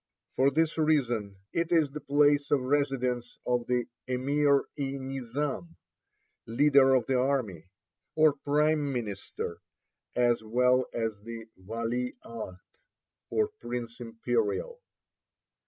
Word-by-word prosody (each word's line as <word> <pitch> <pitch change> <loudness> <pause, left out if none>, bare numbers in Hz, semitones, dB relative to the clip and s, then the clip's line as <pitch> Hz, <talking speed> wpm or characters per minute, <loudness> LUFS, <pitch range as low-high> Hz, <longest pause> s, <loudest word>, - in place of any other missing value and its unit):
For 135 +1 +4
this 160 +3 +1
reason 120 -10 +1 0.2
it 170 0 0
is 160 -5 +3
the 150 +1 -6
place 145 0 +3
of 145 -3 +3
residence 130 -3 0
of 125 -1 0
the 125 -1 +1 0.2
Emir 140 +3 +2
e 135 -1 -2
Nizam 135 +5 -4 0.7
(leader 135 +2 +5
of 125 -3 +2
the 130 0 +1
army), 125 - -1 0.5
or 155 -1 +5
prime 145 +1 +1
minister, 105 -7 -4 0.6
as 120 -2 +3
well 125 +3 +3
as 110 -3 -2
the 115 +1 -8
Vali 115 +6 -3
Ahd, 110 -5 -7 0.7
or 430 -1 +1
Prince 120 -1 -5
Imperial. 420 - -2
130 Hz, 115 wpm, -29 LUFS, 120-145 Hz, 0.7 s, leader